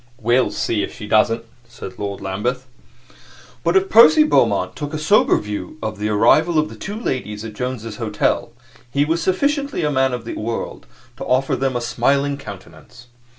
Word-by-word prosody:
"We'll 120 +3 +2
see 110 -3 -1
if - - -5
she 105 - -8
doesn't," 115 +2 +2 0.2
said 95 -6 -10
Lord 100 -1 -4
Lambeth. 105 +7 -3 1.0
But 170 +1 +1
if 190 0 +2
Percy 270 +10 +7
Beaumont 305 - +2
took 145 0 -5
a - - -1
somber 160 +8 +3
view 105 +8 -6
of 110 -1 -4
the 105 +1 -1
arrival 120 +10 +3
of 155 0 +2
the - - -10
two 205 +3 -6
ladies 110 - -4
at 110 - -7
Jones's 115 -2 -5
Hotel, 110 0 -1 0.4
he 140 +4 +1
was 165 +2 0
sufficiently 280 - 0
a 150 - +1
man 130 -1 +2
of 120 -2 -5
the - - -5
world 115 +2 -5 0.3
to - - -6
offer 130 +1 +1
them 135 -1 -1
a 120 - -1
smiling 140 +4 +1
countenance. 120 -3 -12
125 Hz, 180 wpm, -20 LUFS, 110-155 Hz, 1.0 s, Percy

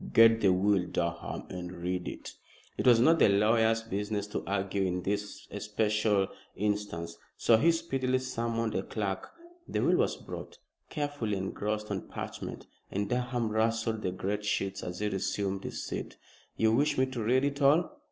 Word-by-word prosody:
"Get 115 0 +7
the 95 - +5
will, 95 0 +2
Durham, 85 0 -2
and 90 -1 -5
read 90 0 -3
it." - - -7 0.4
It - - -1
was 120 -2 +7
not 160 +7 +5
the - - +6
lawyer's 110 +2 +3
business 105 -1 -2
to - - -3
argue 100 0 -1
in 90 -1 0
this 105 +1 -3
especial 105 -1 +1 0.3
instance, 100 -5 -2 0.2
so 115 - +5
he 165 +9 +5
speedily 135 -6 0
summoned 115 -3 -2
a - - 0
clerk. 100 -3 -3 0.4
The - - -1
will - - +4
was - - +1
brought, - - -8 0.3
carefully 145 -9 -2
engrossed 105 +3 -3
on 95 - -3
parchment, - - -6 0.2
and 100 +1 -2
Durham 120 -2 0
rustled 110 0 +1
the 95 - -1
great 100 +3 -2
sheets 100 -2 -1
as 90 0 -5
he 105 - +1
resumed 95 0 -2
his - - -4
seat. - - -5 0.4
"You 110 0 +4
wish 145 +6 +2
me 130 - +4
to 130 -3 -5
read 125 +5 +3
it 145 0 -2
all?" 165 - +3
105 Hz, 170 wpm, -30 LUFS, 95-115 Hz, 0.4 s, Get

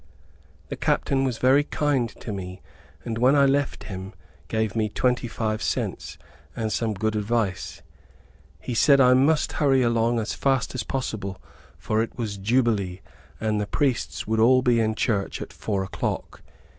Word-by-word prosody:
The - - -3
captain 135 -1 +1
was 125 -3 -1
very 135 +4 +4
kind 145 -5 0
to 110 - -5
me 95 -1 -7 0.4
and 115 -1 -3
when 130 +4 +5
I 140 -1 +5
left 140 0 0
him, 95 0 -7 0.3
gave 110 -2 -1
me 110 -1 0
twenty 125 +2 0
five 110 -1 -2
cents, - - -3 0.4
and 110 -1 -2
some 110 -2 -1
good 110 +2 -1
advice. 105 -2 -2 0.8
He 120 - -5
said 140 +4 +5
I 125 -1 +6
must 145 +4 +3
hurry 135 -3 +4
along 115 0 +2
as 110 - -2
fast 135 -3 0
as 130 - -2
possible, 105 -5 -4 0.4
for 110 0 0
it 115 - -4
was 105 -5 -4
Jubilee, 100 -4 +1 0.4
and 110 -1 0
the 105 - -3
priests 105 - -1
would 110 0 0
all 130 +3 +5
be 120 -2 +3
in 110 -1 +1
church 100 -3 -1
at - - -8
four 100 -3 -2
o'clock. 95 - -4
115 Hz, 165 wpm, -25 LUFS, 105-130 Hz, 0.8 s, I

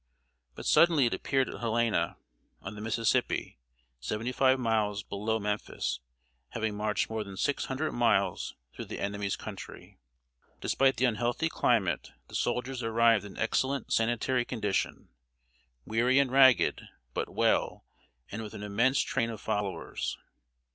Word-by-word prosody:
But - - -8
suddenly 165 -6 +5
it 120 - +1
appeared 135 -2 0
at - - -7
Helena, 115 -6 0 0.4
on - - -7
the 105 - -8
Mississippi, 110 - 0 0.4
seventy 105 - -3
five 130 +1 +3
miles 110 -4 0
below 105 +3 -2
Memphis, 105 -8 -2 0.5
having 110 -2 -2
marched 105 0 0
more 110 -1 -3
than 100 -2 -10
six 140 - 0
hundred 135 +4 -2
miles 115 -5 +1 0.2
through - - -7
the - - -6
enemy's 100 -1 -2
country. - - -9 0.6
Despite 135 0 +2
the 130 - +3
unhealthy 120 +6 0
climate, 100 - +1 0.2
the - - -15
soldiers 130 +1 -1
arrived 115 -2 +3
in 100 - -10
excellent 130 +5 0
sanitary 120 +2 +1
condition, 105 -6 -2 0.8
weary 120 +4 +2
and 140 -2 +3
ragged, 130 -1 +5 0.3
but - - -2
well, - - +1 0.5
and 110 - -4
with 110 0 -8
an 105 - -7
immense 115 +7 +2
train 115 - 0
of 110 -2 -6
followers. 100 -2 -3
115 Hz, 140 wpm, -30 LUFS, 105-125 Hz, 0.8 s, suddenly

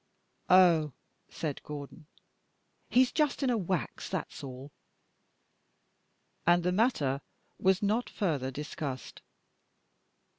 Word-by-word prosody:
"Oh," 170 -6 +6 0.4
said 155 -4 -4
Gordon, 150 +1 -8 0.8
"he's 255 0 +4
just 300 -2 +1
in 260 - +3
a - - +2
wax, 185 -3 -2
that's - - -4
all." 135 +1 -8 1.7
And 175 0 +4
the 180 - +2
matter 180 - +1 0.4
was 190 +1 +3
not 215 +4 +1
further 150 -10 -1
discussed. 140 -1 -6
170 Hz, 100 wpm, -30 LUFS, 145-200 Hz, 1.7 s, Oh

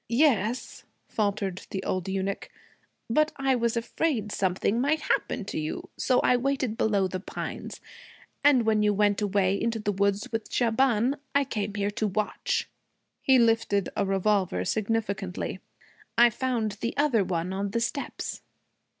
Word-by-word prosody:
'Yes,' 235 -3 +1 0.2
faltered 200 -3 -2
the 190 -1 -4
old 185 0 -2
eunuch, 195 +1 -2 0.6
'but 305 +6 +2
I 270 -1 +1
was 235 -2 +1
afraid 230 -2 -1
something 195 +5 0
might 300 +3 +1
happen 255 -7 -1
to 195 - -3
you. 155 0 -4
So 250 - +2
I 250 - +4
waited 260 -3 -1
below 200 -4 +2
the 185 0 -4
pines. 190 - -6 0.6
And 270 -5 +5
when 215 -1 +3
you 210 -1 +3
went 205 0 +2
away 200 -1 +1
into 230 -1 0
the 210 -1 -1
woods 200 +1 0
with 225 -1 -4
Shaban, 245 +2 +2 0.2
I 280 - +5
came 210 -6 -3
here 205 0 0
to 215 +1 -1
watch.' 210 +1 -1 0.5
He 265 -1 +5
lifted 225 -4 +2
a - - +1
revolver 195 - +1
significantly. 200 - -2 0.6
'I 240 0 +7
found 235 -2 -1
the 235 - -2
other 280 -8 +3
one 180 0 -2
on 200 +1 -2
the 230 +4 -1
steps.' 235 +4 -3
215 Hz, 150 wpm, -27 LUFS, 200-240 Hz, 0.6 s, I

